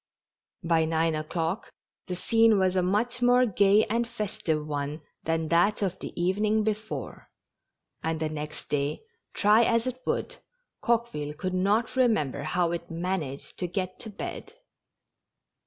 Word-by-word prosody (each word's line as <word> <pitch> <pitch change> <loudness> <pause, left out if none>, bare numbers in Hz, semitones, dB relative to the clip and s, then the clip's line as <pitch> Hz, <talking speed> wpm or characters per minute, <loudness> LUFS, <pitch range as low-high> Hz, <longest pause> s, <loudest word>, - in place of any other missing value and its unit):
By 165 -1 +3
nine 160 0 +1
o'clock, 165 +5 -2 0.4
the 180 - -3
scene 225 +3 +4
was 185 -1 +2
a 185 - +3
much 220 +7 0
more 245 +1 +5
gay 205 0 +4
and 235 +2 0
festive 200 -9 -2
one 145 +1 -3 0.2
than 160 -1 0
that 200 +5 +3
of 190 -1 -2
the - - -6
even 190 +4 +1
ing 215 0 +3
before; 215 0 -4 0.7
and 160 0 -1
the 160 - 0
next 150 -1 -6
day, 145 - -1 0.3
try 210 +3 +5
as 230 +1 +2
it 255 0 -4
would, - - -1 0.4
Coque 235 0 +1
ville 150 0 -4
could 185 +4 -3
not 200 +7 +1
remember 215 - +2
how 170 +3 0
it 170 - -2
had 170 - -26
managed 165 -5 -4
to 180 - -1
get 185 +1 -3
to 225 - -5
bed. 205 - -6
185 Hz, 155 wpm, -27 LUFS, 160-220 Hz, 0.7 s, more